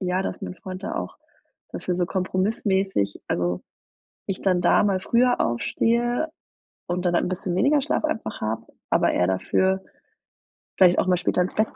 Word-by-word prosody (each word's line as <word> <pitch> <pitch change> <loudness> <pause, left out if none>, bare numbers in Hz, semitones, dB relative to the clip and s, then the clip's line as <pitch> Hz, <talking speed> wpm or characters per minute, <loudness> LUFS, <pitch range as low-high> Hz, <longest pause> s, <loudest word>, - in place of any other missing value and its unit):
ja, 185 0 0
dass - - -4
mein - - -5
Freund 185 0 -8
da - - -4
auch - - -4 0.5
dafür 180 - -3
so 180 - +1
kompromissmäßig 190 - 0
also 90 0 -1 0.7
ich 195 - -3
dann 185 -2 +2
da 175 - +4
mal 195 -2 +2
früher 245 +5 +2
aufstehe 235 - 0 0.6
und 175 +1 -2
dann 175 - +2
halt - - +3
'n - - -2
bisschen 185 -1 -3
weniger 285 +6 +4
Schlaf 305 +2 -1
einfach 310 -8 -3
habe, 110 +1 -3 0.2
aber - - +3
er 90 - +2
dafür 190 - +1 1.0
vielleicht 180 -1 +6
auch - - +1
mal 180 -1 +3
später 180 - +1
ins 180 - -1
Bett 215 +1 0
185 Hz, 175 wpm, -24 LUFS, 175-215 Hz, 1.0 s, vielleicht